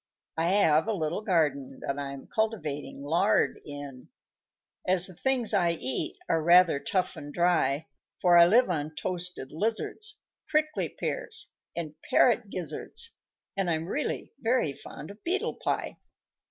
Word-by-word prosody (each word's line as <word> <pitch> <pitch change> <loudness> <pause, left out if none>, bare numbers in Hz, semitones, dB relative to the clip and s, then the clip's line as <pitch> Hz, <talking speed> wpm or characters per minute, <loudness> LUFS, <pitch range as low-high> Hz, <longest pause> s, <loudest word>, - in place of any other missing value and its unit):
_ - - +2
_I 170 - +2
have 155 +4 +4
a 225 - +1
little 165 0 -2
garden 150 - 0
That 140 +1 -2
I'm 140 -1 -6
cultivating 150 -11 -2
lard 170 +8 +2
in, 145 -3 -8 0.8
As 180 -1 +4
the 185 - -4
things 255 +4 0
I 170 -1 +3
eat 130 -5 -1
are 165 - +2
rather 170 -2 +6
tough 185 +4 -1
and 145 0 -8
dry; 160 -4 +2 0.3
For 175 -1 +5
I 170 0 +9
live 240 +7 +5
on 155 -3 -2
toasted 180 -6 -3
lizards, 230 - -2 0.3
Prickly 310 0 +1
pears, 450 - -3 0.2
and 160 -3 -4
parrot 240 -3 +3
gizzards, 185 - -1 0.4
And 195 -2 0
I'm 160 -1 0
really 290 - -2
very 230 - +1
fond 150 +5 -9
of 205 - -16
beetle 370 +3 -1
pie. - - -1
175 Hz, 145 wpm, -28 LUFS, 150-215 Hz, 0.8 s, I